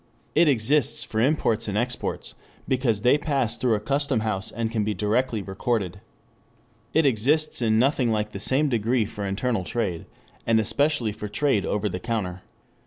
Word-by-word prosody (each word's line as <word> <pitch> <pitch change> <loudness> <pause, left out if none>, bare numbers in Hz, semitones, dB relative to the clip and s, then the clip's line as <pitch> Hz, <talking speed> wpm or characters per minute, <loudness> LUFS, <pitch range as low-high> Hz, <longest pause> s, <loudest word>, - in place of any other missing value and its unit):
It 165 +2 +4
exists 135 +1 +2
for 110 - -2
imports 125 -5 +1
and 105 0 -2
exports 120 +2 -3 0.3
because 120 -5 0
they 125 +4 +4
pass 135 -7 +1
through 120 -3 +2
a - - -1
custom 140 +1 0
house 105 -3 -2
and 115 0 -3
can 110 -2 0
be 105 0 -1
directly 110 +3 0
recorded. 100 -1 -2 0.9
It 160 -1 +3
exists 140 +5 +1
in 110 -2 +2
nothing 130 0 +2
like 105 -1 -1
the 100 - -6
same 135 +8 +2
degree 115 -1 +1
for 100 0 -5
internal 105 +1 -1
trade, 95 -5 -3 0.4
and 115 -1 +4
especially 135 +1 +1
for 105 +1 -6
trade 110 -2 0
over 105 0 0
the 90 -2 -4
counter. 95 -6 -3
115 Hz, 170 wpm, -25 LUFS, 105-130 Hz, 0.9 s, It